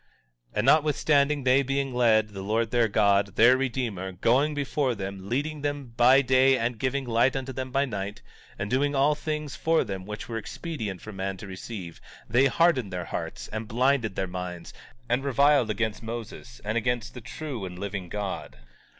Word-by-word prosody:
17:30 - - -8
And - - +1
notwithstanding 150 -1 +3
they 130 +2 +4
being 135 0 -1
led, 110 -3 +3
the 100 -2 -7
Lord 110 +3 0
their 120 -2 +3
God, 100 -1 +2
their 120 +3 +7
Redeemer, 120 -8 -2
going 130 - +2
before 140 -2 0
them, 95 -1 -6
leading 145 +4 -2
them 145 -4 -3
by 130 +3 +6
day 130 +1 +4
and 115 -1 -2
giving 135 0 -1
light 120 +3 +2
unto 135 0 -3
them 130 0 -4
by 135 +2 +1
night, 100 -4 -5 0.3
and 100 - -3
doing 140 +5 +1
all 140 +2 +4
things 150 -3 -4
for 165 +4 +2
them 95 -1 -6
which 105 0 -6
were 115 -1 -3
expedient 110 - -5
for 110 - -8
man 95 0 -3
to 100 - -9
receive, 95 -2 -8 0.3
they 125 +5 +4
hardened 135 - +2
their 90 -1 -4
hearts - - -5
and 110 0 -5
blinded 120 -2 +1
their 95 - -1
minds, 90 -1 -6 0.3
and 120 +3 +1
reviled 140 -2 +3
against 110 0 -1
Moses 120 +2 -7
and 110 +3 +1
against 120 +1 -2
the 125 - -9
true 135 -1 -6
and 90 -1 -6
living 95 -2 -5
God. 100 -11 -5
120 Hz, 185 wpm, -27 LUFS, 105-135 Hz, 0.3 s, their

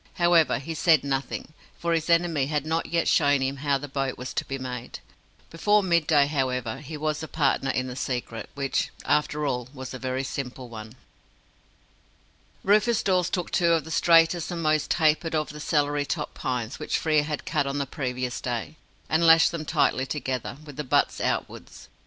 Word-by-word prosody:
However, 170 -6 +4
he 140 +6 -5
said 160 -1 +4
nothing, 140 +2 -3 0.2
for 170 0 -1
his 165 0 -1
enemy 165 -5 +2
had 150 -1 -1
not 160 +1 -1
yet 170 0 0
shown 145 -1 +3
him 135 +1 -2
how 140 0 +1
the 145 +2 -7
boat 135 -1 -2
was 125 0 -6
to - - -1
be 135 - -5
made. 125 -2 -6 0.5
Before 205 +5 +3
midday, 160 -5 +3
however, 130 -4 -2
he 150 +2 -7
was 155 0 -2
a 160 - -5
partner 140 -3 +1
in 130 -1 0
the 125 -1 -6
secret, 125 -3 -4
which, 140 -1 -1 0.2
after 150 0 +1
all, 125 -3 -2
was 130 -1 -7
a 130 - -6
very 130 +1 -2
simple 130 -2 -5
one. 110 0 -9 1.7
Rufus 215 +4 +3
Dawes 180 -2 +2
took 180 -2 -3
two 170 -2 +3
of 165 -3 +1
the 160 - -9
straightest 165 0 +4
and 170 -2 -4
most 155 -1 +1
tapered 160 0 +2
of 155 -1 -1
the 150 - -9
celery 145 -1 0
top 150 -1 -3
pines 125 -1 -3
which - - -1
Frere 155 -2 +2
had 150 0 -4
cut 140 - 0
on 140 +1 -2
the 140 - -1
previous 125 -3 -3
day, 125 +5 -4 0.3
and 165 +2 +2
lashed 165 0 +7
them 165 -2 -5
tightly 140 -4 +1
together, 130 -3 -3
with 145 -3 -11
the 150 - -2
butts 130 - +1
outwards. - - -4
145 Hz, 190 wpm, -26 LUFS, 130-165 Hz, 1.7 s, lashed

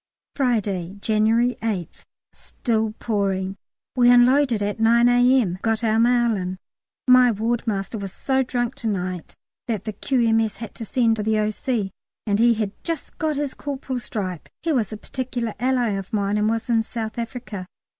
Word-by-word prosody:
Friday, 205 -8 -1
January 220 +4 +2
8th. 205 -7 -4 0.3
Still 220 -3 -2
pouring. 195 -3 -1 0.4
We 245 -1 +5
unloaded 245 0 +5
by 205 0 0
9 235 +2 +5
A.M., 245 -6 +3
got 225 0 0
our 220 0 +2
mail 240 -1 +3
in. 185 -1 -3 0.5
My 255 -1 +7
wardmaster 220 -1 -2
was 195 -1 -5
so 265 +6 0
drunk 245 -1 -1
to 235 - -3
night 185 -4 -3 0.3
that 215 -5 -2
the 215 - -4
Q.M.S. 225 -2 +1
had 225 -1 -7
to 225 - -7
send 230 0 +2
for - - -2
the 220 +1 +1
O.C. 215 0 -1 0.3
And 205 -1 +1
he 235 0 +5
had 210 -2 -2
just 330 -3 -5
got 310 -1 0
his 285 -1 -2
corporal's 265 -3 -5
stripe. 185 -7 -4
He 330 - +1
was 240 -8 0
a 215 - -5
particular 240 -1 -4
ally 250 -1 +1
of 195 -2 -4
mine 205 -1 0
and 210 +1 +2
was 225 +1 -1
in 230 -2 +3
South 225 0 -5
Africa. 230 -5 -6
225 Hz, 165 wpm, -23 LUFS, 205-245 Hz, 0.5 s, My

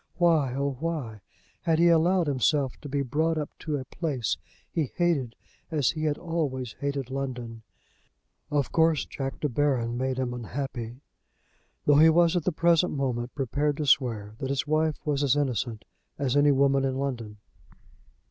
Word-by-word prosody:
Why, 160 -7 +3
oh 140 -1 -1
why, 140 -10 -3 0.4
had 165 -1 +2
he 170 +1 +5
allowed 170 +2 +4
himself 140 0 +1
to 145 - -8
be 140 0 0
brought 155 +5 0
up 150 -2 -3
to 150 -2 -2
a 130 - -6
place 135 - -2 0.3
he 155 -6 -2
hated 155 -10 +1 0.3
as 155 -2 +2
he 155 -1 -3
had 150 -1 +1
always 145 -8 -3
hated 140 -2 -3
London! 125 -4 -4 0.9
Of 145 -3 0
course 160 -2 +3
Jack 135 -1 -5
De 150 - +1
Baron 125 -3 0
made 130 0 -1
him 125 -2 -1
unhappy, 125 0 -5 0.8
though 145 0 +5
he 160 +1 +8
was 170 +1 +4
at 175 -4 0
the - - +2
present 170 +1 +3
moment 125 -4 -2
prepared 145 +2 0
to 150 - -2
swear 115 -6 +2
that 135 - -3
his 140 -1 0
wife 155 0 +1
was 145 -2 0
as 140 -1 +3
innocent 120 -6 -1 0.3
as 135 -2 0
any 145 0 +5
woman 135 0 +3
in 135 -1 0
London. 120 -6 -4
140 Hz, 165 wpm, -27 LUFS, 130-155 Hz, 0.9 s, he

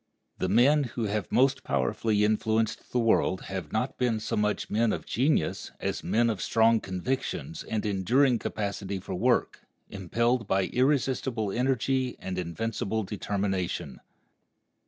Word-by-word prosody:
The 95 - 0
men 135 +8 +4
who 120 -1 -4
have 105 -2 -2
most 135 +1 +3
powerfully 100 - +1
influenced 110 +1 0
the - - 0
world 115 -5 +2
have 95 -6 -6
not - - -2
been 120 -3 +1
so - - -3
much 105 0 0
men 115 +1 +1
of - - -5
genius 135 +6 0
as - - -3
men 115 +1 +2
of 110 -5 -1
strong 115 0 +3
convictions 130 - -3
and 110 -1 -3
enduring 115 +6 +2
capacity 100 -2 -3
for - - -7
work, 120 +7 +1 0.3
impelled 115 +5 0
by 95 0 +2
irresistible 130 -4 0
energy 130 +2 0
and 90 -1 -4
invincible 110 +4 -2
determination. 95 -8 -3
110 Hz, 135 wpm, -28 LUFS, 95-125 Hz, 0.3 s, men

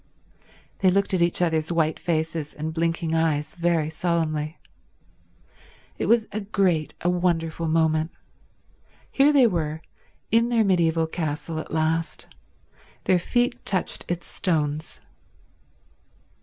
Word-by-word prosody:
They 190 - +4
looked 200 +2 +1
at 185 - +2
each 170 +1 +2
other's 160 -1 0
white 160 -2 +1
faces 160 -2 -2
and 155 +1 -4
blinking 165 0 -1
eyes 155 -2 0
very 170 -3 0
solemnly. 160 -2 -1 1.4
It - - -1
was 230 -1 +3
a 210 - -2
great, 190 -6 0
a - - -1
wonderful 165 -2 0
moment. 160 0 +2 1.0
Here 280 +2 +5
they 275 -4 +6
were, 160 -7 -1 0.5
in 230 +2 +3
their 230 -2 +3
mediaeval 165 -4 +2
castle 160 -1 -3
at - - -7
last. 160 -1 -1 0.8
Their 185 - +3
feet 240 +7 0
touched 185 -3 -1
its 175 0 -3
stones. 155 -3 -2
165 Hz, 120 wpm, -24 LUFS, 160-180 Hz, 1.4 s, they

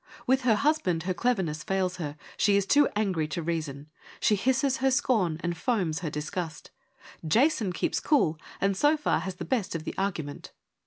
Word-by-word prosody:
With 260 +1 +3
her 235 -4 +3
husband 210 - +1
her 185 +1 -1
cleverness 180 -7 0
fails 185 -2 -1
her: 150 -4 -5 0.2
she 200 -1 +3
is 200 - +1
too 290 +7 +4
angry 190 -7 0
to 165 +2 -4
reason: 155 -4 -3 0.3
she 210 - +3
hisses 265 +5 +1
her 265 0 +2
scorn 220 - +1
and 175 0 -1
foams 180 -6 0
her 170 -4 -3
disgust. 155 +2 -5 0.5
Jason 225 - +2
keeps - - -1
cool 165 - +2 0.2
and 195 0 +1
so 295 +9 +3
far 300 - +1
has 190 -1 -5
the - - -6
best 225 -10 -1
of 160 - -3
the - - -5
argument. 165 -7 -4
190 Hz, 180 wpm, -28 LUFS, 160-250 Hz, 0.5 s, too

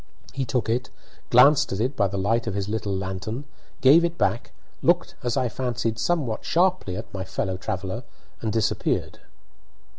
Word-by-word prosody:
He 135 -1 -2
took 120 0 -1
it, 120 +3 -1 0.4
glanced 140 +4 +6
at 95 - -2
it 130 +5 0
by 100 - +2
the 100 +1 -4
light 115 +5 +1
of 100 - -2
his 100 -1 -2
little 105 -1 -2
lantern, 95 +7 -4 0.4
gave 145 +6 +7
it 170 0 -1
back, 115 - 0 0.3
looked, - - +2
as 120 -1 -1
I 125 - +2
fancied, 120 -2 -2
somewhat 135 -4 0
sharply 175 - +1
at - - -8
my 95 -1 -3
fellow 95 0 -2
traveller, 95 +5 -4 0.4
and 110 - -1
disappeared. 110 -1 0
115 Hz, 170 wpm, -25 LUFS, 100-130 Hz, 0.4 s, gave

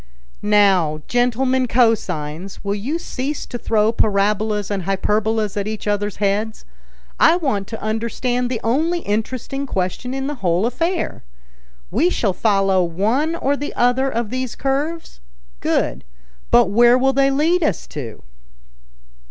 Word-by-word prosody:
"Now, 190 -7 +3
gentlemen 255 +1 +1
cosines, 195 -8 0
will 200 0 -1
you 240 +11 -2
cease 285 -3 -4
to 245 - -6
throw 220 -1 +2
parabolas 210 -1 0
and 200 -2 -1
hyperbolas 210 +3 0
at 205 0 -2
each 215 0 -5
other's 205 0 -1
heads? 210 +2 -1 0.5
I 325 - +6
want 220 - -1
to 225 - -7
understand 235 +3 -1
the 245 -3 -2
only 320 +9 +1
interesting 255 +5 -3
question 195 +6 -2
in 270 0 -3
the 290 - -2
whole 180 +2 +2
affair. 330 +9 -2 0.7
We 290 - +3
shall 210 - 0
follow 195 -2 +2
one 220 - 0
or 285 -3 0
the 290 +1 -5
other 250 +2 +2
of 230 -3 -3
these 255 -1 -3
curves? 290 - -2 0.4
Good. - - -1 0.5
But 235 -5 +4
where 240 +3 +6
will 265 +1 +2
they 275 +1 +3
lead 315 +6 +2
us 210 - 0
to?" 125 -7 -7
225 Hz, 140 wpm, -20 LUFS, 200-265 Hz, 0.7 s, I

